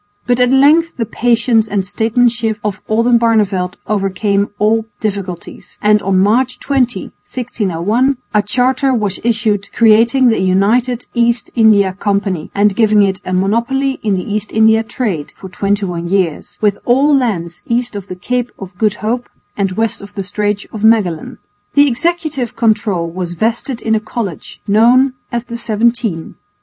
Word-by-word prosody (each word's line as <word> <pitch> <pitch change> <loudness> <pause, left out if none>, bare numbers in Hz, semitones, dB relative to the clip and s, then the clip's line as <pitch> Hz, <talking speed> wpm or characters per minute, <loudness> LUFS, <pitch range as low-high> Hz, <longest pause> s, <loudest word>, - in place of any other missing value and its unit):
But 245 0 +1
at 250 0 +4
length 300 +5 +4
the 230 - -1
patience 230 0 +1
and 200 -2 -1
statesmanship 225 +2 0
of 210 -2 -3
Oldenbarneveldt 220 -5 +2
overcame 200 0 0
all 220 +2 +1
difficulties, 195 -5 -6
and 210 0 +3
on 195 -1 0
March 235 +7 +2
20,1601, 240 -2 -1 0.2
a 210 - +4
charter 255 +5 +1
was 205 -4 -1
issued 215 -3 0
creating 230 +3 +4
the 225 - +1
United 225 +7 +1
East 235 0 +1
India 210 -5 +4
Company 200 -4 -2
and 205 0 +2
giving 215 -2 +4
it 190 -1 0
a - - -5
monopoly 235 +9 0
of 210 -2 +1
the 185 - -3
East 210 0 -3
India 220 0 +4
trade 215 - -4
(for 190 - -10
21 190 -3 -2
years) 180 -4 -1
with 205 -2 +1
all 275 +4 +3
lands 180 -10 -2
east 240 -1 -1
of 200 -1 -6
the 185 - -6
Cape 245 +6 -2
of 195 0 -10
Good 215 -2 +1
Hope 240 +3 -2 0.3
and 195 -2 -1
west 225 +2 -1
of 200 +1 -12
the 195 - -3
Straits 205 +1 -2
of 215 -1 -6
Magellan. 210 -8 +1 0.4
The 285 0 +6
executive 295 -2 -2
control 210 -6 +1
was 175 +1 -5
vested 230 +6 -2
in 220 - +1
a 220 - +2
College 215 -5 -6
known 245 +6 +4 0.2
as 235 -1 -2
the 235 -1 -7
Seventeen. 225 -6 -1
215 Hz, 155 wpm, -15 LUFS, 200-240 Hz, 0.4 s, The